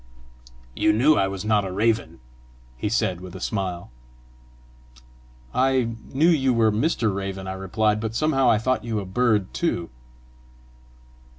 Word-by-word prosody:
"You 105 - +3
knew 130 +8 +4
I 95 - +2
was 95 +1 -5
not 105 -1 +2
a 95 - -4
raven!" 105 - 0 0.5
he 105 - -3
said 105 -5 0
with 95 0 -10
a - - -7
smile. 95 - -3 1.6
"I 130 -2 +2 0.2
knew 150 +5 +3
you 135 -7 +3
were 110 -1 +3
Mr. 115 -2 0
Raven," 95 -1 -4
I 95 - -3
replied; 105 +3 0
"but 110 0 -4
somehow 135 -2 +2
I - - +4
thought 130 +4 -1
you 115 -2 -2
a 100 - -5
bird 105 0 +1
too!" 85 - -2
110 Hz, 150 wpm, -24 LUFS, 95-125 Hz, 1.6 s, knew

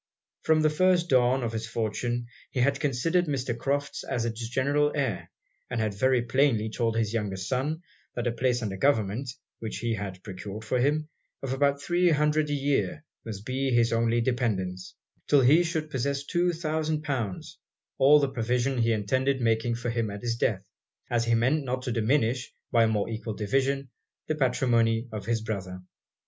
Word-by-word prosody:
From 160 0 +3
the 155 - +4
first 175 +1 +3
dawn 130 0 +3
of 115 - -1
his 115 0 -3
fortune, 120 +2 -2 0.2
he 130 - -3
had 140 +2 +2
considered 160 +6 +1
Mr. 130 -4 -1
Crofts 140 +3 -2
as 120 -2 -2
it's 115 0 -4
general 145 +4 +2
heir; 130 -9 -2 0.4
and 120 - -2
had 110 -2 0
very 125 +4 +2
plainly 120 -3 +2
told 115 -1 0
his 110 -1 0
younger 105 -4 -1
son, 135 - -2 0.3
that 120 - -2
a 120 - +1
place 125 0 0
under 100 -3 -3
government, 115 +1 +1 0.3
which 110 -1 -5
he 115 +2 -1
had 100 -4 -5
procured 100 +2 -7
for 125 +3 0
him, 150 +4 +1 0.4
of 135 -1 -2
about 140 +1 +2
three 175 +3 +3
hundred 150 0 +2
a - - 0
year, 135 - 0 0.2
must 105 -2 -7
be 135 +1 -1
his 120 -2 +3
only 115 +1 +2
dependance; 100 -7 -2 0.3
till 145 -2 +5
he 145 +7 +6
should 160 -3 -2
possess 140 +1 -1
two 175 +2 +1
thousand 155 -2 -2
pounds, 120 -10 -4 0.4
all 145 +3 +7
the 140 - +2
provision 125 +1 0
he 115 0 +3
intended 130 +6 0
making 115 0 +1
for 120 0 -3
him 115 -2 -1
at 100 +2 -7
his 115 -1 0
death 100 -4 -1 0.4
as 120 -1 +2
he 115 0 +3
meant 130 +7 +2
not 130 -1 -3
to 125 - -2
diminish, 120 +2 +1 0.2
by 115 -1 +5
a - - +2
more 105 -2 0
equal 110 -1 -4
division, 135 +6 0 0.4
the - - +1
patrimony 120 -4 +2
of 105 -1 -6
his 115 -1 0
brother. 95 -4 -4
120 Hz, 185 wpm, -27 LUFS, 115-140 Hz, 0.4 s, all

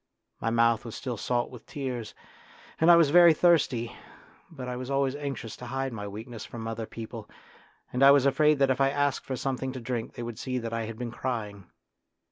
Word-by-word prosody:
My 115 - 0
mouth 115 0 +3
was 115 -2 -7
still 125 -3 -4
salt 120 +2 -1
with 125 - -12
tears, 130 -7 -5 0.6
and 160 - +4
I 170 - +10
was 165 -4 +5
very 170 -1 +8
thirsty, 140 -9 +2 0.5
but 135 -6 -8
I 125 - -3
was 125 +1 -6
always 135 -1 +1
anxious 135 -6 -5
to 125 - -9
hide 135 0 -3
my 105 -2 -5
weakness 110 +2 -8
from 115 -1 -7
other 115 0 -4
people, 110 -1 -8 0.6
and 125 - -1
I 135 - +9
was 140 -1 +6
afraid 150 +2 +4
that 135 -1 +3
if 130 - 0
I 135 - +4
asked 145 -1 0
for 130 - -2
something 130 0 -2
to 130 - -5
drink 120 -1 -4
they 120 - -5
would 120 -2 -6
see 130 -1 -3
that 115 -2 -4
I 115 -1 -2
had 110 0 -7
been 120 -1 -4
crying. 105 -6 -4
125 Hz, 215 wpm, -28 LUFS, 115-135 Hz, 0.6 s, I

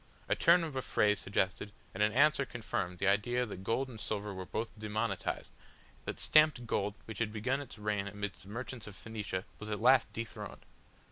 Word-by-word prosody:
A - - +3
turn 170 +1 +6
of 155 -4 -4
a 130 - 0
phrase 105 -4 +2
suggested, 95 +1 -1 0.2
and 95 - -3
an 105 0 +4
answer 145 +4 +5
confirmed 100 -8 -3
the 95 - 0
idea 120 +5 +3
that 95 -4 -7
gold 130 +6 0
and 115 -4 -9
silver 105 -1 -2
were 95 -1 -6
both 115 +1 -2
demonetised, 110 0 -2 0.5
that - - -3
stamped 155 -5 +5
gold 105 -2 0
which 110 -2 -7
had 115 -2 0
begun 125 +6 0
its 140 - -10
reign 105 -1 -1
amidst 100 0 -4
the 95 - -13
merchants 120 +1 -5
of 105 - -9
Phoenicia 105 -2 -4
was 105 - -6
at 105 - -2
last 125 +2 +5
dethroned. 115 0 -6
110 Hz, 195 wpm, -33 LUFS, 100-125 Hz, 0.5 s, turn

